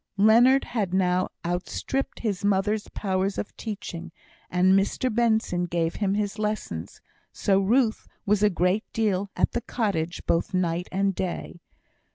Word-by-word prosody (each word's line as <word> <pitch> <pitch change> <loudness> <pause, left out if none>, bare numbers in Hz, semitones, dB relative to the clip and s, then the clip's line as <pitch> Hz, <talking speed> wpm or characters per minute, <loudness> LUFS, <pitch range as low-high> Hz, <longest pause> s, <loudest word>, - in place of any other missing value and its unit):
Leonard 235 +6 +6
had 200 -6 -2
now 185 -1 +2 0.2
outstript 180 +9 -3
his 200 -5 -2
mother's 205 +1 +1
powers 190 0 -1
of - - -5
teaching, 175 -6 -6 0.4
and 180 +1 +4
Mr 200 +5 +1
Benson 220 -6 +1
gave 170 -1 -1
him 200 -2 0
his 210 0 -2
lessons; 210 - -4 0.3
so 195 -1 +2
Ruth 225 +3 +2 0.2
was 205 -1 +2
a 210 - +5
great 180 +3 0
deal 205 -3 0
at - - +2
the 240 - -2
cottage 200 -9 -2
both 170 +3 0
night 175 -1 0
and 195 +1 +1
day. 175 -1 -4
195 Hz, 145 wpm, -26 LUFS, 180-215 Hz, 0.4 s, Leonard